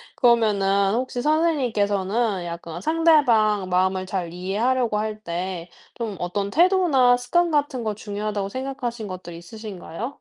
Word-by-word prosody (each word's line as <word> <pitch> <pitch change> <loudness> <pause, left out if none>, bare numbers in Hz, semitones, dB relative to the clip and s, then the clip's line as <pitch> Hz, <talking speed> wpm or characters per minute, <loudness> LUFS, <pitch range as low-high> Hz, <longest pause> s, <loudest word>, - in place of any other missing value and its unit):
그러면은 200 -5 +3
혹시 250 0 -2
선생님께서는 225 - +1
약간 170 0 -7
상대방 240 - +3
마음을 185 +1 +1
잘 180 -3 -3
이해하려고 215 +5 0
할 215 0 -3
때 175 -1 -4 0.3
좀 225 -4 -4
어떤 195 +3 -2
태도나 320 - +4
습관 335 +8 +1
같은 285 -5 0
거 215 -1 -1
중요하다고 205 -1 -4
생각하신 250 -3 -4
것들이 180 -2 -8
있으신가요? 205 +1 -7
215 Hz, 330 characters per minute, -23 LUFS, 190-250 Hz, 0.3 s, 태도나